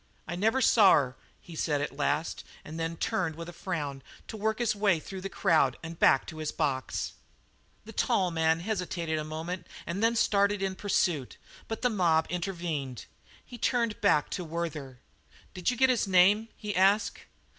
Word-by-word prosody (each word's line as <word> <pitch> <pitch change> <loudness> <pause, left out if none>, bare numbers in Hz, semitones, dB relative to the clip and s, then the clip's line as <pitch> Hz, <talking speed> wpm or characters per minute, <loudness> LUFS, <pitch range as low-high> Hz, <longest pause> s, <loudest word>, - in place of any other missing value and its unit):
"I 170 - -3
never 225 +8 +2
saw 205 -5 +7
her," 130 -3 +2 0.2
he 170 - -12
said 150 -2 0
at 140 - -3
last, 150 +3 -1 0.2
and 160 +2 -7
then 165 0 -3
turned 165 -2 -1
with 165 +1 -7
a 175 - -8
frown 145 -8 -4 0.3
to - - -6
work 220 +1 -1
his 235 -3 0
way 200 -5 +2
through 190 +4 -8
the 195 - -4
crowd 160 -10 +2
and 165 0 -8
back 135 - +5
to 160 - -9
his 155 -1 -2
box. 130 -3 -2 0.7
The 225 - -10
tall 185 -2 +1
man 160 0 +2
hesitated 175 -5 -2
a - - -3
moment 160 +4 -5 0.2
and 190 +5 -3
then 230 +1 +3
started 200 -2 +2
in 190 -1 -1
pursuit, 175 -8 0 0.3
but 225 +2 -5
the 250 - +3
mob 170 -6 +3
intervened. 170 - -3 0.4
He 240 - -11
turned 235 -2 0
back 175 -8 +3
to 180 - -3
Werther. 160 -5 -5 0.6
"Did 180 +2 -1
you 250 - -1
get 260 +1 +5
his 235 -5 0
name?" 195 +4 +5
he 210 -1 -4
asked. 200 +2 +3
175 Hz, 180 wpm, -29 LUFS, 160-205 Hz, 0.7 s, saw